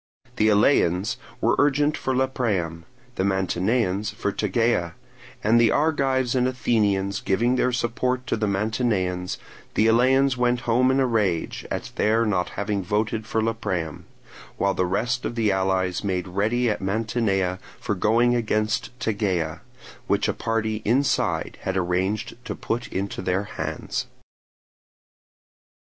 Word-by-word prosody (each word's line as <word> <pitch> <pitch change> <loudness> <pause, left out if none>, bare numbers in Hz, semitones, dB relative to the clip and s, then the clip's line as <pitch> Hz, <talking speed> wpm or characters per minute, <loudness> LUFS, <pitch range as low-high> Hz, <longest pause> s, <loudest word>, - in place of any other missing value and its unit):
The 110 - +4
Eleans 100 -4 +3 0.2
were - - +3
urgent 145 +1 +3
for 130 -3 -2
Lepreum; 105 - -1 0.3
the - - +1
Mantineans 95 +2 0
for 105 -1 -2
Tegea; 105 -4 0 0.5
and 115 +3 +4
the 115 - +5
Argives 135 -5 +1
and 125 -1 +2
Athenians 100 -6 +1
giving 120 +6 +1
their 125 0 +2
support 125 +2 -1
to - - 0
the 105 -1 -1
Mantineans, 100 -3 -1 0.4
the 110 - +3
Eleans 130 +4 +4
went 125 0 +1
home 125 +3 +3
in 130 +1 +2
a 135 - +3
rage 105 -9 -1
at - - -4
their 110 +2 +3
not 95 -4 0
having 100 -1 -1
voted 110 +3 -1
for 110 0 0
Lepreum; 100 -8 -3 0.5
while 100 0 +1
the 90 - 0
rest 125 +7 -1
of - - -3
the 110 -3 +2
allies 95 -1 0
made 95 -2 -1
ready 110 +7 0
at 105 - -1
Mantinea 95 -2 0 0.2
for - - -2
going 115 +5 +3
against 110 -2 0
Tegea, 95 -8 -1 0.5
which - - +1
a - - +1
party 110 -1 -1
inside 130 +5 +1
had 95 0 -2
arranged 95 +6 -1
to - - -4
put 120 +2 -3
into 95 0 -4
their 95 +2 0
hands. 105 - -4
110 Hz, 140 wpm, -24 LUFS, 95-120 Hz, 0.5 s, the